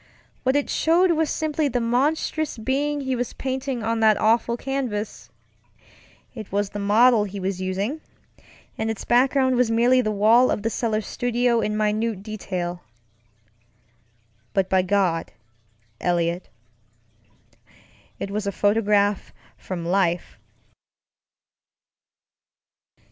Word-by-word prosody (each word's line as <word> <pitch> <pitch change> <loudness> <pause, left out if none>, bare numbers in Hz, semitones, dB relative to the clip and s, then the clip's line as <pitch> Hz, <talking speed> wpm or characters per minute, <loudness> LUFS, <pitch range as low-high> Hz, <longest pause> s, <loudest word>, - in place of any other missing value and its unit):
What 260 +1 +1
it 290 - +1
showed 345 +3 +3
was 320 -2 +1
simply 310 -1 -1
the 250 -2 -1
monstrous 280 +5 0
being 280 +5 -1
he 265 -1 -1
was 245 0 -3
painting 260 -2 -3
on 225 +1 -1
that 220 -1 +4
awful 230 +2 +2
canvas. 245 -6 -4 1.0
It 220 -5 -9
was 200 0 -1
the 205 - -5
model 215 +2 +4
he 200 0 -7
was 190 0 -3
usingŌĆöand 195 +10 -2 0.8
its 220 -1 -3
background 260 +1 +3
was 250 -2 +2
merely 240 +3 +4
the 215 - -1
wall 220 +4 +4
of 205 - -1
the 225 - -1
cellar 220 -2 -1
studio 240 +2 0
in 210 0 -1
minute 215 -1 -1
detail. 180 -5 -4 1.7
But 190 -1 +1
by 190 -1 +4
God, 185 -3 0 0.7
Eliot, 175 0 -1 1.7
it 200 - -5
was 210 0 -3
a - - 0
photograph 205 -1 +1 0.2
from 175 -3 -6
life. 175 -1 0
220 Hz, 115 wpm, -23 LUFS, 200-255 Hz, 1.7 s, that